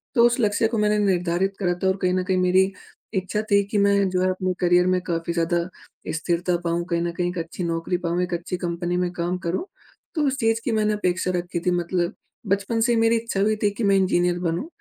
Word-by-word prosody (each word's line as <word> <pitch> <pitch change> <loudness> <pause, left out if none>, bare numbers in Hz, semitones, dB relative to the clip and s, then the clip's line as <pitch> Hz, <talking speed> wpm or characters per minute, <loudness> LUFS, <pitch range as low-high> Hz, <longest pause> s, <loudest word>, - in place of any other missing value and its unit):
तो 235 - +6
उस 240 +1 +2
लक्ष्य 215 0 +2
को 225 0 -2
मैंने 210 0 +2
निर्धारित 180 +1 +1
करा 180 -2 +1
था - - +3
और 190 +1 +2
कहीं 180 0 +2
न 185 0 +1
कहीं 185 0 0
मेरी 185 +1 +3 0.4
इच्छा 190 +2 -1
थी 200 0 +5
कि 210 - +1
मैं 200 -1 +3
जो 185 0 0
है 185 - +2
अपने 185 0 -1
करियर 180 0 +4
में 185 0 +2
काफ़ी 170 -1 -2
ज़्यादा 170 0 +1 0.5
स्थिरता 175 +2 0
पाऊँ, 170 +1 0
कहीं 170 -1 0
न 170 - -1
कहीं 175 +1 -1
एक 180 - -6
अच्छी 170 +2 -4
नौकरी 165 +1 -1
पाऊँ, 175 +2 0
एक 180 - -3
अच्छी 175 +1 -3
कंपनी 175 0 -2
में 180 -1 0
काम 180 +2 -1
करूँ 185 - -1 0.5
तो 305 - +1
उस 270 0 0
चीज 225 -1 +2
की 240 - 0
मैंने 215 -1 +1
अपेक्षा 185 -2 0
रखी 175 0 -2
थी 180 - +3
मतलब 175 0 -1 0.3
बचपन 200 +4 0
से 240 +1 +3
ही 225 - +2
मेरी 225 0 +4
इच्छा 225 -4 -2
भी 215 +1 +2
थी 205 - +4
कि 235 - -2
मैं 200 -1 +4
इंज़ीनियर 180 -2 +2
बनूँ। 175 - -2
185 Hz, 240 wpm, -23 LUFS, 175-200 Hz, 0.5 s, तो